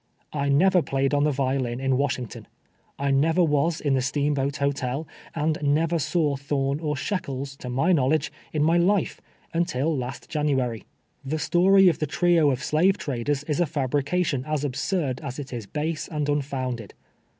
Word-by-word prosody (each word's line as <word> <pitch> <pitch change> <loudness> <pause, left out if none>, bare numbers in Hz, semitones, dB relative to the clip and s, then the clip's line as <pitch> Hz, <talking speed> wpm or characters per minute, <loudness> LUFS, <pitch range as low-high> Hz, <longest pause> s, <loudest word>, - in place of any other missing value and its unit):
I 140 -1 -1
never 180 +6 +4
played 135 -1 0
on 145 0 +3
the 150 - +2
violin 130 -3 -1
in 135 0 +1
Washington. 130 -3 -2 0.5
I 140 0 0
never 160 +6 +3
"was 155 +1 +1
in 145 -2 0
the 130 - +2
Steamboat 140 +1 0
Hotel, 140 +1 -1 0.3
and 155 0 0
never 155 +3 +2
saw 150 -1 0
Tliorn 140 +1 -1
or 150 -2 -1
Shekels, 140 -6 -3
to 125 - -7
my 135 +9 +1
knowledge, 150 -1 +2 0.2
in 150 -1 0
my 165 +3 +4
life, 190 +2 +1 0.3
until 165 -2 0
last 130 +1 -5
Jan 150 -2 -1
uary. 125 -5 -1 0.4
The 140 +4 -2
story 185 +5 +5
of 170 - +3
the 155 - -1
trio 170 -1 +3
of 130 +1 -1
slave 185 +6 +3
traders 140 +1 -2
is 150 +1 -2
a 175 - +2
fab 140 -4 -2
rication 145 -1 0
as 155 -2 -1
absurd 140 0 -1
as 140 -4 -6
it 140 -3 -7
is 115 -4 -5
base 155 +4 -3
and 150 -3 -2
unfounded. 130 -6 -2
145 Hz, 175 wpm, -25 LUFS, 135-160 Hz, 0.5 s, story